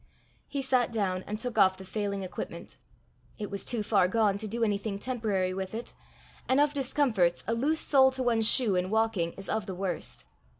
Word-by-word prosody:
He 280 Hz, -1 st, -3 dB
sat 255 Hz, -2 st, +2 dB
down 190 Hz, -4 st, -1 dB
and 210 Hz, -, -3 dB
took 230 Hz, 0 st, -2 dB
off 190 Hz, -1 st, +5 dB
the 190 Hz, -, -10 dB
failing 200 Hz, 0 st, -3 dB
equipment. 185 Hz, -, -7 dB, 0.6 s
It 210 Hz, -2 st, -5 dB
was 200 Hz, -, -4 dB
too 230 Hz, -3 st, -1 dB
far 200 Hz, -3 st, +3 dB
gone 205 Hz, 0 st, +1 dB
to 215 Hz, -, -4 dB
do 230 Hz, +3 st, -2 dB
anything 205 Hz, -1 st, -1 dB
temporary 205 Hz, -5 st, -1 dB
with 190 Hz, +2 st, -5 dB
it; 235 Hz, -, -6 dB, 0.6 s
and 260 Hz, +2 st, +4 dB
of 290 Hz, 0 st, +3 dB
discomforts 250 Hz, -10 st, +1 dB
a 225 Hz, -, 0 dB
loose 290 Hz, +7 st, +1 dB
sole 265 Hz, -2 st, +5 dB
to 260 Hz, 0 st, -2 dB
one's 225 Hz, -3 st, +4 dB
shoe 240 Hz, -7 st, +3 dB
in 180 Hz, +1 st, 0 dB
walking 220 Hz, -6 st, 0 dB
is 195 Hz, -, -9 dB
of 220 Hz, -1 st, -2 dB
the 190 Hz, -, -5 dB
worst. 175 Hz, -, -3 dB
215 Hz, 200 wpm, -29 LUFS, 190-240 Hz, 0.6 s, off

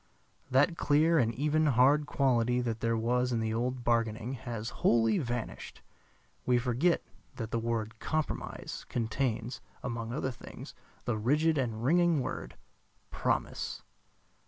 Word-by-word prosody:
That 145 Hz, +6 st, +3 dB
clear 160 Hz, +3 st, +4 dB
and 115 Hz, -3 st, +2 dB
even 150 Hz, +3 st, +2 dB
hard 140 Hz, +3 st, +4 dB
quality 125 Hz, -4 st, +2 dB
that 115 Hz, -2 st, -2 dB
there 115 Hz, 0 st, +1 dB
was 125 Hz, +2 st, +1 dB
in 115 Hz, -, +1 dB
the 110 Hz, 0 st, -1 dB
old 125 Hz, +2 st, -1 dB
bargaining 115 Hz, 0 st, 0 dB
has 115 Hz, -3 st, -5 dB
wholly 115 Hz, -2 st, +4 dB
vanished. 120 Hz, -3 st, -5 dB, 0.6 s
We 125 Hz, -1 st, +3 dB
forget 125 Hz, +8 st, +1 dB, 0.3 s
that 110 Hz, -2 st, -5 dB
the 115 Hz, -, 0 dB
word 115 Hz, -1 st, -2 dB
"compromise" 155 Hz, -1 st, -3 dB
contains, 120 Hz, 0 st, -2 dB, 0.2 s
among 115 Hz, -2 st, -3 dB
other 130 Hz, 0 st, -1 dB
things, 120 Hz, -, -10 dB, 0.3 s
the 115 Hz, -3 st, -1 dB
rigid 150 Hz, +7 st, +2 dB
and 115 Hz, -3 st, -2 dB
ringing 170 Hz, +3 st, +4 dB
word 130 Hz, -, -4 dB, 0.6 s
"promise." -, -, -2 dB
120 Hz, 135 wpm, -31 LUFS, 115-140 Hz, 0.6 s, clear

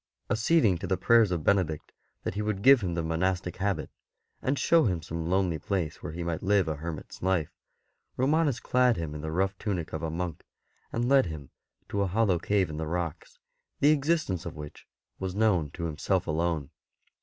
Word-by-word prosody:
Acceding 110 Hz, -, +3 dB
to 95 Hz, -, -4 dB
the 95 Hz, +1 st, +1 dB
prayers 115 Hz, +3 st, +5 dB
of 85 Hz, -4 st, -2 dB
Benedict 90 Hz, -6 st, +1 dB, 0.3 s
that -, -, -2 dB
he 105 Hz, -, -2 dB
v/ould 105 Hz, -2 st, -2 dB
give 135 Hz, -2 st, +7 dB
him 90 Hz, -3 st, -2 dB
the 85 Hz, -, -1 dB
monastic 90 Hz, +2 st, -1 dB
habit, 100 Hz, +1 st, -1 dB, 0.5 s
and 135 Hz, +2 st, 0 dB
show 165 Hz, +1 st, +4 dB
him 90 Hz, -6 st, 0 dB
some 80 Hz, 0 st, -4 dB
lonely 90 Hz, -3 st, +1 dB
place 90 Hz, -3 st, -2 dB
where -, -, -5 dB
he 85 Hz, +2 st, -5 dB
might 85 Hz, -2 st, -2 dB
live 95 Hz, -2 st, +2 dB
a 80 Hz, -2 st, -2 dB
hermit's 80 Hz, 0 st, -7 dB
life, 90 Hz, -5 st, 0 dB, 0.7 s
Romanus 145 Hz, -1 st, +2 dB
clad 125 Hz, 0 st, +2 dB
him 80 Hz, -3 st, -4 dB
in 75 Hz, -, -6 dB
the 80 Hz, -, -4 dB
rough 95 Hz, +3 st, 0 dB
tunic 95 Hz, -7 st, -3 dB
of 80 Hz, -, -3 dB
a 80 Hz, -, -2 dB
monk, 85 Hz, 0 st, -4 dB, 0.5 s
and 120 Hz, +1 st, -1 dB
led 135 Hz, -5 st, +5 dB
him 75 Hz, -4 st, -8 dB, 0.4 s
to 100 Hz, -, -1 dB
a 100 Hz, -, +2 dB
hollow 95 Hz, -2 st, +2 dB
cave 95 Hz, -1 st, +1 dB
in 75 Hz, -, -6 dB
the 80 Hz, 0 st, -3 dB
rocks, 85 Hz, -1 st, -4 dB, 0.4 s
the 145 Hz, -, +5 dB
existence 150 Hz, -, +1 dB
of 85 Hz, -4 st, -7 dB
which 75 Hz, -1 st, -10 dB, 0.3 s
was 95 Hz, -1 st, -3 dB
known 100 Hz, -8 st, +2 dB
to 85 Hz, +4 st, -5 dB
him 80 Hz, -2 st, -5 dB
self 95 Hz, 0 st, +1 dB
alone. 80 Hz, -2 st, -1 dB
90 Hz, 200 wpm, -28 LUFS, 80-105 Hz, 0.7 s, give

